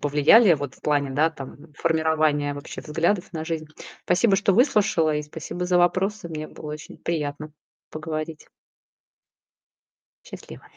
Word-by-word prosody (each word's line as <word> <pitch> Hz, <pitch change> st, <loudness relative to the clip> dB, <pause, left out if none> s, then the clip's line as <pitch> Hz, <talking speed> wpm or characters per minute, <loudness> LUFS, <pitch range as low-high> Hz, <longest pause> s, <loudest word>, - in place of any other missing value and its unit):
повлияли. 150 Hz, +8 st, +5 dB
Вот 140 Hz, -3 st, -5 dB
в -, -, -23 dB
плане, 145 Hz, -2 st, 0 dB
да, 150 Hz, +5 st, +2 dB
там, 145 Hz, +1 st, -11 dB
формирования 155 Hz, -2 st, +1 dB
вообще 145 Hz, -, -8 dB
взглядов 170 Hz, +5 st, -1 dB
на 160 Hz, -2 st, -4 dB
жизнь. 160 Hz, -1 st, -4 dB, 0.4 s
Спасибо, 195 Hz, +4 st, +3 dB
что 195 Hz, 0 st, +2 dB
выслушала 200 Hz, -, +3 dB
и 150 Hz, -, -1 dB
спасибо 160 Hz, +4 st, -6 dB
за 180 Hz, 0 st, +2 dB
вопросы. 185 Hz, +2 st, +1 dB
Мне 155 Hz, -1 st, -6 dB
было 150 Hz, -, -8 dB
очень 150 Hz, 0 st, -9 dB
приятно 155 Hz, -2 st, -4 dB, 0.4 s
поговорить. 155 Hz, 0 st, -6 dB, 1.8 s
Счастливо. -, -, -11 dB
155 Hz, 135 wpm, -24 LUFS, 150-175 Hz, 1.8 s, повлияли